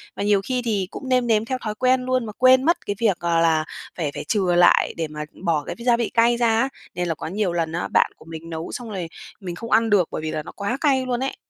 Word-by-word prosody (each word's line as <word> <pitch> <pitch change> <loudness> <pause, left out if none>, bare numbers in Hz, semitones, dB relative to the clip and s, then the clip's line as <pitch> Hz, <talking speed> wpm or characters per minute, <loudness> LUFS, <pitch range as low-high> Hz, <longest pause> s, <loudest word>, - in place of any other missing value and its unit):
Mà - - -3
nhiều 205 -1 +3
khi 255 +1 -1
thì 200 -5 0
cũng 265 - -7
nêm 250 -1 +2
nếm 220 -1 +2
theo 260 +2 -2
thói 215 -1 -3
quen 255 +2 +2
luôn 255 -2 0
mà 215 - -6
quên 255 0 +6
mất 335 +4 +1
cái 205 - -2
việc, 210 -6 +2
ờ, 170 -1 +1
là 160 -2 +2 0.3
phải 155 -5 -2
phải 145 - -5
chừa 180 0 +1
lại 175 0 +5
để 165 -1 -2
mà 150 0 -6 0.2
bỏ 160 -3 +1
cái - - -4
gia 240 -1 +4
vị 235 -2 -1
cay 235 0 +4
ra 240 - +2
á, 265 - 0 0.3
nên 175 0 -1
là 165 - -1
có - - -6
nhiều 190 +1 -1
lần 165 -2 -1
á, 170 - -2
bạn - - +2
của - - -17
mình 165 0 -9
nấu 160 0 -5
xong 240 -2 -6
rồi 185 -5 -4 0.3
mình 180 -4 -6
không 230 +4 -8
ăn 225 +1 +4
được 195 -5 +3
bởi - - -4
vì 155 0 -3
là 155 -1 -3
nó - - -9
quá 200 +5 -3
cay 265 -4 +2
luôn 245 -1 -1
ấy. 265 +1 -2
205 Hz, 285 wpm, -22 LUFS, 170-245 Hz, 0.3 s, quên